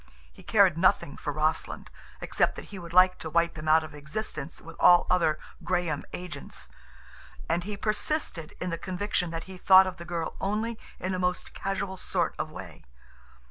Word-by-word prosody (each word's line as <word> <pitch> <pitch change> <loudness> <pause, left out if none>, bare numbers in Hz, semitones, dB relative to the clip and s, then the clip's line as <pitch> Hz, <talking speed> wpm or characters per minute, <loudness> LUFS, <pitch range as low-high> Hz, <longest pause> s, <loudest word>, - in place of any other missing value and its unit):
He - - -15
cared 190 -6 +4
nothing 170 -5 +3
for 150 - -4
Rossland, 155 +2 -1 0.3
except - - +1
that - - -8
he 195 - -6
would 170 -1 -9
like 185 +1 +5
to 160 - -5
wipe 170 +1 +2
him 155 0 -7
out 160 +1 +5
of 155 - -9
existence 150 +2 -5
with 165 - -11
all 175 0 +7
other 165 -4 +3 0.3
Graham 175 -4 -1
agents. 180 0 -7 0.8
And 170 +2 0
he 205 0 -4
persisted 215 - -2
in 180 - -3
the 165 - -3
conviction 185 -1 -1
that 165 0 -4
he 185 -1 -11
thought 190 +1 +8
of 185 - -5
the 170 - -8
girl 170 -2 -3
only 215 +3 -1 0.2
in 185 +1 -2
a 185 - -1
most 180 0 -1
casual 195 -1 -3
sort - - 0
of - - -2
way. - - -10
180 Hz, 180 wpm, -28 LUFS, 165-190 Hz, 0.8 s, thought